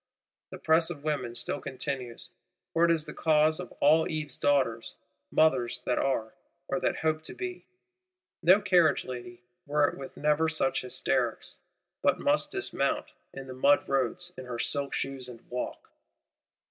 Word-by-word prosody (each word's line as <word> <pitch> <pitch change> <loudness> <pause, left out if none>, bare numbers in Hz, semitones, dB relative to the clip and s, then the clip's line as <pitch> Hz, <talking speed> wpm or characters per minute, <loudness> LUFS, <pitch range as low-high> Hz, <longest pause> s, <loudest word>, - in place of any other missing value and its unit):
The - - -8
press 160 +1 +3
of 150 -5 -7
women 145 -6 -2
still 120 - -2
continues, 130 -2 -5 0.4
for 165 - +3
it - - +2
is 165 -2 +2
the 150 - -8
cause 155 0 +3
of 180 - -7
all 155 +3 +4
Eve's 150 -4 -3
Daughters, 130 -6 +1 0.4
mothers 130 -7 +2
that 125 - +1
are, 115 -5 -1 0.3
or 180 - -1
that - - 0
hope 155 -1 0
to - - -6
be. 365 -1 -6 0.7
No 180 +4 +6
carriage 180 -5 +3
lady, 120 -1 -8 0.2
were 145 0 +3
it - - -5
with 135 - -9
never 150 +2 +2
such 155 -4 +1
hysterics, 125 - -1 0.4
but - - +3
must - - +2
dismount, - - -1 0.2
in 135 0 -8
the 130 - -8
mud 140 +3 +3
roads, 140 +7 -1
in 130 - -8
her 125 -1 -5
silk 140 +3 -1
shoes, 135 -2 -4
and 115 -2 -13
walk. 125 0 -5
145 Hz, 160 wpm, -29 LUFS, 125-160 Hz, 0.7 s, No